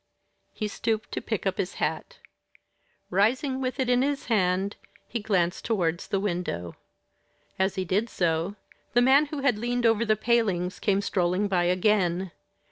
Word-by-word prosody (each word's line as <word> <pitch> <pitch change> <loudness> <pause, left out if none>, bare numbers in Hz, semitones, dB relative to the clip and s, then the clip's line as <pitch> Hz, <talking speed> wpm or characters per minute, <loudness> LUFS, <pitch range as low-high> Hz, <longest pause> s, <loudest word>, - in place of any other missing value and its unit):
He 215 - -3
stooped 220 +1 -2
to - - -3
pick - - -3
up - - -1
his - - -2
hat. - - -3 0.9
Rising 260 +8 +1
with 255 +1 -3
it 260 - +1
in 250 0 +3
his 280 +1 -1
hand, 190 0 +1 0.3
he 235 - -3
glanced 185 -5 0
towards 175 -6 -1
the 195 - 0
window. 175 - -3 0.8
As 190 0 +1
he 190 -2 -2
did 205 +6 0
so, 170 +2 0 0.4
the 245 - +5
man 275 +4 +5
who 290 -1 -5
had 250 -6 +2
leaned 240 +1 -1
over 225 0 +4
the 215 -1 +2
palings 205 -5 0
came 200 -1 +1
strolling 185 0 0
by 180 -3 +1
again. 185 -1 +1
205 Hz, 160 wpm, -27 LUFS, 180-235 Hz, 0.9 s, the